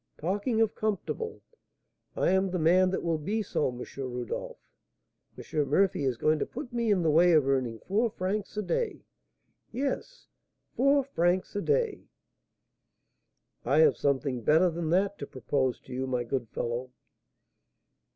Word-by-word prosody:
Talking 205 - -1
of 225 - +2
comfortable, 220 - -3 0.7
I - - +2
am 190 0 +2
the 180 - -2
man 180 +3 +4
that 190 - -2
will 165 -2 0
be 210 +8 -1
so, 155 - 0
M. 125 -1 -5
Rodolph! 125 -3 -4 0.8
M. 150 -2 -2
Murphy 165 -2 +2
is 130 -3 0
going 155 +5 +2
to - - 0
put 255 -4 -8
me 235 -2 0
in 185 -4 +2
the 160 - +3
way 170 +3 +5
of 150 -4 +4
earning 130 -4 0
four 220 +5 +2
francs 200 +1 -3
a 210 - 0
day, 455 - -2 0.7
yes, 275 - -3 0.5
four 275 +2 +4
francs 180 -9 0
a 205 - 0
day!" 455 - 0 1.6
"I - - +1
have 470 -2 +5
something 135 -3 0
better 160 - +4
than 165 -1 -3
that 195 +4 +1
to 140 - -5
propose 130 0 -1
to 130 - -11
you, 130 +1 -2
my 125 -2 -1
good 120 -1 -3
fellow." 120 +3 -3
175 Hz, 155 wpm, -29 LUFS, 135-215 Hz, 1.6 s, way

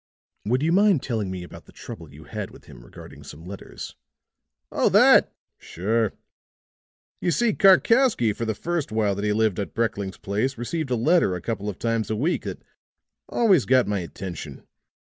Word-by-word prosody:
"Would 125 +6 +1
you 165 - +2
mind 195 -4 +4
telling 110 -6 -2
me 95 -1 -5
about 90 - -12
the - - -17
trouble 80 -3 -10
you 75 +2 -13
had 75 - -6
with - - -16
him - - -14
regarding - - -13
some 80 +3 -11
letters?" 95 +2 -9 0.8
"Oh, - - +2
that! - - +6 0.3
Sure. 110 +4 -1 1.1
You - - 0
see, 230 +5 +2
Karkowsky 195 - +4
for 115 - -4
the 110 -1 -2
first 170 0 -3
while 110 -2 +1
that 100 +1 -4
he 105 - +1
lived 110 -2 +1
at 100 - -5
Brekling's 100 -4 -2
place 110 +7 -2
received 140 +5 -3
a 125 - +1
letter 135 - +2
a - - -4
couple 105 -1 -3
of 95 - -6
times 115 -2 -1
a 110 - 0
week 150 +11 -1
that - - -6 0.7
always 195 - +3
got 130 -1 +4
my 100 -1 -1
attention. 85 -5 -7
110 Hz, 180 wpm, -24 LUFS, 100-145 Hz, 1.1 s, that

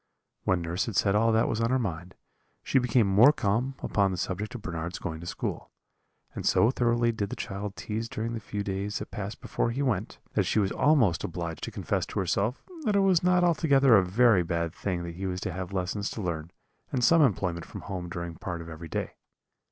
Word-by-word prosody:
"When 90 -2 +2
nurse 85 +5 -1
had 110 - -4
said 100 - +3
all 115 +2 +3
that 110 0 +3
was 115 - -1
in 115 0 +1
her 130 - +3
mind, 90 -7 -4 0.5
she 135 - +3
became 125 -2 +3
more 105 +8 +7
calm 125 0 0
upon 100 -2 +2
the 95 - -3
subject 100 +6 -3
of 120 - -7
Bernard's 85 -1 -4
going 80 -4 -5
to 85 - -8
school; - - -4 0.6
and - - -5
so 115 - +4
thoroughly 120 -2 +2
did 105 -3 -3
the - - -4
child 100 0 -5
tease 110 +2 -4
during 115 +1 -3
the 115 - -3
few 105 -1 -4
days 100 +1 -2
that - - -7
passed 100 +1 -6
before - - -1
he 130 +5 -1
went, 130 -5 -1 0.2
that - - +2
she - - 0
was 100 -3 +2
almost 125 - +3
obliged 85 -1 -4
to - - -5
confess - - -2
to - - -3
herself 100 +6 0 0.2
that 210 -2 +2
it 200 - +5
was 190 -3 +4
not 180 0 +3
altogether 140 -7 +5
a 100 - +6
very 105 +1 +4
bad 85 -1 -2
thing 90 -3 -3
that 85 0 -7
he 95 +1 -3
was 90 0 -3
to - - -2
have 90 0 -5
lessons 100 +2 -2
to 110 - -5
learn, 80 -2 -3 0.4
and 125 - 0
some 165 +6 +6
employment 90 - +1
from - - -8
home 90 -3 -5
during 85 -1 -5
part 85 +1 -5
of 85 - -9
every 80 +1 -8
day. - - -3
100 Hz, 225 wpm, -28 LUFS, 90-120 Hz, 0.6 s, more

